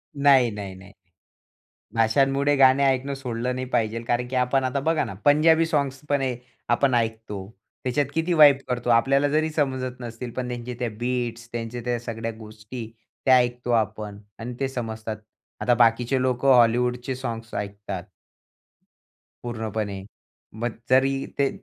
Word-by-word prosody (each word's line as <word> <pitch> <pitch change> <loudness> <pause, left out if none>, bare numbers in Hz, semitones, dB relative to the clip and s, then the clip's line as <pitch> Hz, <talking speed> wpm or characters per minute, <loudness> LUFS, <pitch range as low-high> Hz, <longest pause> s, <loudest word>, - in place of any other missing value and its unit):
नाही, 140 -4 +5
नाही, 100 -2 -6
नाही. 95 +1 -14 1.0
भाषांमुळे 135 +5 +3
गाणे 135 +1 +6
ऐकणं 135 +1 +1
सोडलं 125 -1 -3
नाही 130 0 -3
पाहिजे, 115 -2 0
कारण 120 +1 -1
की 130 - -5
आपण 125 +1 +2
आता 130 +2 0
बघा 160 +3 +1
ना, - - -6
पंजाबी 160 +3 +5
सॉंग्स 140 -4 -1
पण 140 -2 +1 0.5
आपण 125 +1 +3
ऐकतो. 110 -4 -2 0.4
त्याच्यात 130 +3 +1
किती 165 +3 0
वाइब 145 -4 +8
करतो. 125 -1 -2
आपल्याला 135 +5 +4
जरी 155 +2 +1
समजत 130 -4 -2
नसतील 120 0 -6
पण 125 -1 -2
त्यांचे 120 0 -5
त्या 120 -2 -1
बिट्स, 120 -1 -2
त्यांच्या 120 +1 -4
त्या 120 -1 0
सगळ्या 115 -1 -4
गोष्टी, 110 +2 -9 0.3
त्या 130 -1 +7
ऐकतो 120 0 0
आपण 105 -2 -1 0.2
आणि 120 +2 -5
ते 135 - 0
समजतात. 110 -3 -5 0.4
आता 125 - +3
बाकीचे 120 +2 +3
लोकं 130 +1 +3
हॉलिवूडचे 125 +2 +2
सॉग्स 115 -3 -6
ऐकतात 100 -2 -5 1.4
पूर्णपणे 110 -4 -4 0.6
मग 120 -1 -1 0.2
जरी 135 +1 +3
ते 140 -1 +3
125 Hz, 145 wpm, -24 LUFS, 115-135 Hz, 1.4 s, वाइब